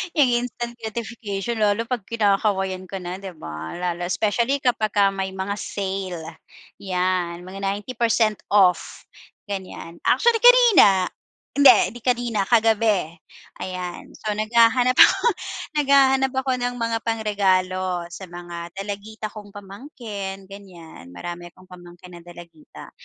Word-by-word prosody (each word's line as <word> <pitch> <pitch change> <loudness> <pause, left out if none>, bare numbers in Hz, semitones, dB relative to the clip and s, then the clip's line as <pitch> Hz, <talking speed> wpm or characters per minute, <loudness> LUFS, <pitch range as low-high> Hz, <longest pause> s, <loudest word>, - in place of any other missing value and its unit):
Instant 240 -3 0
gratification 220 -1 -5
lalo 210 +1 +2
pag 230 -3 -4
kinakawayan 195 -4 0
ka 190 0 -7
na 180 +2 -5
'di 190 -3 -9
ba? 80 - -8
Lalo 175 0 -3
specially 235 +8 0
kapag 220 -5 0
ka 200 -1 +4
may 190 -1 -4
mga 190 +1 -3
sale, 185 -5 -5 0.4
'yan 180 -2 -2
mga 185 +2 -9
90% 215 +2 0
off, 190 -3 +2 0.4
ganyan 190 -4 -7
actually 470 -1 +3
kanina, 445 - +6 0.4
hindi 280 -2 +9 0.2
'di - - -8
kanina 240 -4 0
kagabi, 220 -6 +2 0.5
ayan 180 -1 -6
so 215 - -4
naghahanap 235 +3 +3
ako, - - +6 0.5
naghahanap 270 -2 +4
ako 265 0 0
ng 245 0 -2
mga 230 -1 -1
pangregalo 185 -5 0
sa 190 +2 -9
mga 175 -1 -8
dalagita 205 +2 -6
kong 205 -1 -11
pamangkin 200 -2 -8
ganyan 170 - -13
marami 175 - -7
akong 185 +1 -20
pamangkin 175 0 -13
ng 170 - -19
dalagita. 170 -3 -13
200 Hz, 120 wpm, -22 LUFS, 185-230 Hz, 0.5 s, hindi